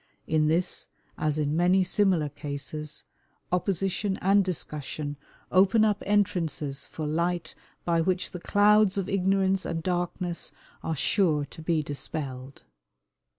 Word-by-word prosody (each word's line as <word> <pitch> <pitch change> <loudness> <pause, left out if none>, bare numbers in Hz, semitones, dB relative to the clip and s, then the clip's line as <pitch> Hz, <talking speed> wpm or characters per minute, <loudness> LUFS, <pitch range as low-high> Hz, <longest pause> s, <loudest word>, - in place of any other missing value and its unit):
In 155 -1 +2
this, 170 +3 0 0.3
as 155 -1 0
in 150 0 0
many 180 +3 +4
similar 185 -4 +2
cases, 145 +1 -6 0.5
opposition 190 +2 0
and 200 +2 +4
discussion 150 -4 -4 0.4
open 200 +4 +5
up 210 -1 +1
entrances 165 -8 0
for 155 - -5
light 170 +3 -1 0.3
by 170 -1 +2
which 180 +2 0
the 180 - -6
clouds 205 +1 +4
of 195 -2 -1
ignorance 195 0 +2
and 165 -1 -3
darkness 175 -1 -2 0.3
are 160 - -2
sure 155 -2 +2
to 160 - -12
be 160 -1 +1
dispelled. 135 -2 -6
175 Hz, 125 wpm, -27 LUFS, 155-190 Hz, 0.5 s, open